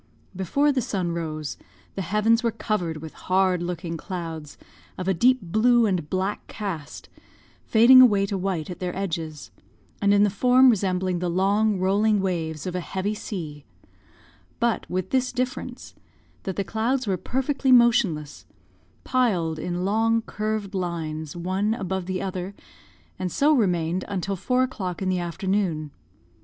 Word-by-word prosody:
Before 280 - +2
the 270 -2 0
sun 185 -6 -2
rose, 155 -3 -4 0.4
the 195 - -4
heavens 210 +5 +2
were 235 - +1
covered 195 -7 -2
with 160 - -8 0.2
hard 185 -1 +3
looking 170 -1 -4
clouds, 165 -4 -6 0.4
of 185 - -4
a 190 - +3
deep 250 +9 +4
blue 230 +6 +3
and 180 -7 -1
black 190 +3 -2
cast, 180 -9 -6 0.6
fading 240 +3 +8
away 205 -6 +5
to 200 - -3
white 185 -3 -2
at 180 - -8
their 180 -1 -3
edges, 165 -6 -4 0.5
and 200 0 +3
in 205 0 +5
the 205 - +3
form 250 +5 +5
resembling 185 -3 0
the 180 0 -1
long, 200 +4 +2
rolling 205 +3 +2
waves 165 -5 -2
of 180 - -3
a 180 - -1
heavy 190 +3 -3
sea 160 -9 -6 1.0
but 235 -1 0
with 185 +1 -3
this 255 -1 +1
difference, 250 +1 -4 0.5
that 190 -3 -3
the 200 - -1
clouds 235 +6 -1
were 195 -3 0
perfectly 265 - -1
motionless, 225 - +3 0.6
piled 185 -12 +1
in 180 +2 -3
long 225 +3 +2
curved 215 -2 -3
lines, 160 -4 -4
one 190 +5 -1
above 190 -3 -3
the 185 0 -2
other, 190 0 -4 0.6
and 185 -1 -2
so 295 - +3
remained 180 - +1
until 195 0 -2
four 250 +7 +1
o'clock 190 -9 -4
in 185 - 0
the 185 -1 +1
afternoon. 175 -3 -1
190 Hz, 150 wpm, -24 LUFS, 175-220 Hz, 1.0 s, fading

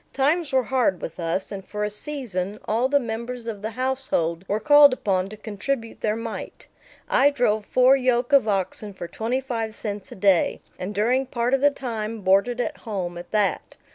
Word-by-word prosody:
Times 295 +4 +1
were 260 -1 +3
hard 245 -7 +1
with 165 - -7
us, 170 +3 -2
and 195 -1 -6
for 210 +2 -4
a 210 - 0
season 210 -6 -4
all 235 +4 +1
the 285 0 +4
members 235 0 -5
of 220 -3 -5
the 215 - -3
household 250 -9 -1
were 210 - 0
called 290 0 +7
upon 190 -6 0
to 215 - -9
contribute 225 +3 -4
their 215 -1 +1
mite. 230 0 -6 0.4
I 280 +2 +5
drove 220 -6 0
four 255 +1 +5
yoke 250 -1 +1
of 275 -5 +6
oxen 200 +1 -2
for 180 -2 -7
twenty 230 +8 -2
five 225 -4 -3
cents 205 -3 -4
a - - -8
day, 195 -3 +3 0.2
and 195 +3 -5
during 250 +6 +1
part 240 0 -1
of 270 - +3
the 290 - +6
time 230 -5 -5
boarded 200 +6 +2
at 245 - -2
home 185 -5 -4
at 175 0 -9
that. 205 -6 -1
225 Hz, 195 wpm, -24 LUFS, 200-255 Hz, 0.4 s, called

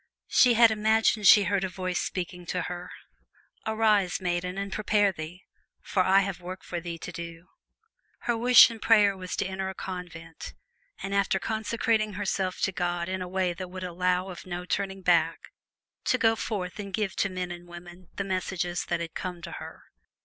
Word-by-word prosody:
She 245 -2 +5
had 230 0 +7
imagined 220 -1 +3
she 205 - +9
heard 195 0 0
a 190 - -1
voice 185 0 -2
speaking 180 -1 -4
to 180 0 -1
her: 180 +1 -6 0.8
"Arise, 215 -4 +2
maiden, 180 0 -2
and 200 0 -4
prepare 205 -1 +2
thee, 170 +1 -8 0.4
for 190 - 0
I 190 +2 +5
have 195 -2 -4
a - - -20
work 185 +1 -7
for 175 - -4
thee 170 -1 -5
to 180 - -7
do!" 170 0 -8 0.7
Her 240 - 0
wish 245 +1 +8
and 225 -1 -9
prayer 210 -3 +5
was 185 -1 -5
to - - -1
enter 190 0 -3
a 190 - -7
convent, 170 -4 -8 0.5
and 195 - -3
after 200 -1 +2
consecrating 220 +1 0
herself 190 -1 -2
to - - +2
God 175 -1 -2
in 185 0 -3
a 180 - -4
way 185 -1 0
that 185 +1 -6
would 185 0 -7
allow 180 +1 0
of 185 0 -9
no 175 0 -5
turning 195 0 -2
back, 165 -2 +3 0.7
to 255 - +3
go 225 -1 +3
forth 200 -4 -4
and 200 -1 -6
give 205 -4 -2
to 200 - +1
men 185 -1 -4
and 175 0 -9
women 175 +1 -12
the 200 - -2
messages 185 -2 -2
that 170 -1 -1
had 165 -1 -5
come 180 -1 -5
to - - -6
her. - - -9
185 Hz, 195 wpm, -27 LUFS, 175-200 Hz, 0.8 s, she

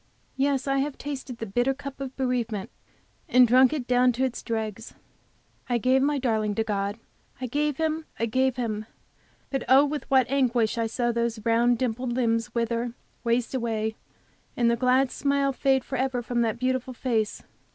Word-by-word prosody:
Yes, 270 -1 +1
I 275 0 +2
have 280 0 -2
tasted 270 -3 -6
the 225 - -4
bitter 245 +6 0
cup 275 0 -8
of 265 -1 -5
bereavement, 240 -6 -2 0.6
and 250 0 +6
drunk 255 +3 +6
it 295 -5 -3
down 250 0 +4
to 255 +3 -1
its 255 -2 -2
dregs. 220 -1 -4 0.7
I 245 - +2
gave 255 +3 +3
my 290 +1 +2
darling 220 -5 0
to 225 - +1
God, 200 -1 -2 0.4
I 255 - -3
gave 290 +3 -1
him, 315 0 -1
I 230 - 0
gave 260 +2 +1
him! 220 -4 -3 0.6
But, 270 - -1
oh, 270 +3 +7
with 290 0 -4
what 265 -2 +5
anguish 245 -4 +1
I 225 - +1
saw 240 +1 0
those 235 -2 -2
round, 235 +1 +3
dimpled 245 0 -2
limbs 235 -1 0
wither 230 0 0
and 240 -1 -4 0.3
waste 235 +1 0
away, 220 -3 -1 0.6
the 235 -1 +3
glad 255 +2 +2
smile 280 -1 +1
fade 265 -1 +2
forever 260 -1 -2
from 240 0 -1
that 225 -1 0
beautiful 255 0 -1
face! 225 -4 -1
245 Hz, 175 wpm, -26 LUFS, 230-265 Hz, 0.7 s, oh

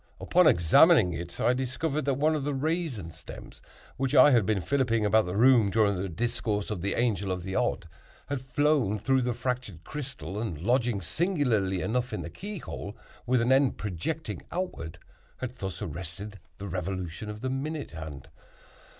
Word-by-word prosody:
Upon - - +4
examining 90 - +6
it 85 +1 -7
I 120 - +3
discovered 135 +4 -2
that 140 -2 +1
one 155 +4 +2
of 150 -3 -1
the 145 0 -1
raisin 145 - -2
stems - - -11 0.4
which 135 +2 0
I 135 +2 +8
had 115 -6 +4
been 110 -3 +2
filliping 115 -1 +1
about 110 -1 +3
the 90 - -3
room 120 -3 +6
during 105 0 +3
the 95 0 -3
discourse 105 +2 -2
of 100 -5 -3
the 100 +2 -1
Angel 105 -5 0
of 90 -1 -3
the 95 +1 -5
Odd, 95 -2 0 0.4
had 140 -3 -3
flown 130 -5 +1
through 130 +5 +2
the 120 -1 -1
fractured 125 -11 -3
crystal, 135 -8 -6
and 95 -10 -4
lodging, 120 - +1
singularly 115 - 0
enough, 125 +2 -1
in - - -3
the - - -7
key 205 +1 -7
hole, 105 - -7 0.3
with 125 -1 +3
an 120 - +2
end 135 0 +4
projecting 105 - -4
outward, 170 - -4 0.4
had 125 0 -6
thus 95 0 -5
arrested 95 +4 -7 0.2
the 100 - -6
revolution 95 +2 -4
of 105 0 -7
the 130 0 -2
minute 145 +3 -3
hand. 80 -4 -8
115 Hz, 175 wpm, -28 LUFS, 95-135 Hz, 0.4 s, I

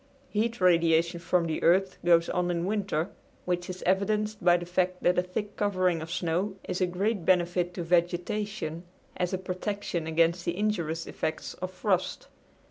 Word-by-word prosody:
Heat 230 +3 -1
radiation 170 -1 +3
from 170 0 +1
the 160 -1 -2
earth 190 +2 +3
goes 170 -1 +5
on 180 0 0
in 170 0 -1
winter, 195 -5 -1 0.3
which 175 0 -1
is 185 0 -6
evidenced 210 +2 +1
by 175 0 +6
the 175 - -6
fact 180 +1 -1
that 180 0 +4
a - - +4
thick 200 +3 -5
covering 185 -5 +1
of 160 - -7
snow 175 +3 -1
is 180 - -3
a 185 - +3
great 195 +2 -1
benefit 175 0 +2
to 175 - -3
vegetation 175 +1 -1 0.3
as 180 -1 -1
a 185 - 0
protection 185 -2 -3
against 165 +2 +2
the 170 +1 -2
injurious 170 -6 -1
effects 160 - -4
of 185 - -5
frost. 185 0 -1
180 Hz, 170 wpm, -28 LUFS, 170-195 Hz, 0.3 s, by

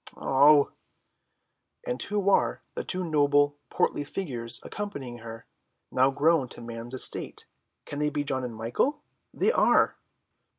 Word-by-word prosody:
"Oh!" 145 +2 +5 1.1
"And 125 - -3
who 205 -1 -2
are - - +1
the - - -4
two 185 0 -3
noble 145 -2 +2
portly 145 - 0
figures 130 -8 -2
accompanying 140 - -6
her, 115 0 -9 0.5
now 130 +1 +4
grown 145 -1 +2
to - - -11
man's 115 +1 -7
estate? 130 - 0 0.4
Can 145 - -5
they 150 0 +1
be 145 0 -2
John 135 -2 -2
and 120 -2 -5
Michael? 120 - -1 0.3
They - - +2
are!" - - +3
145 Hz, 135 wpm, -27 LUFS, 120-155 Hz, 1.1 s, Oh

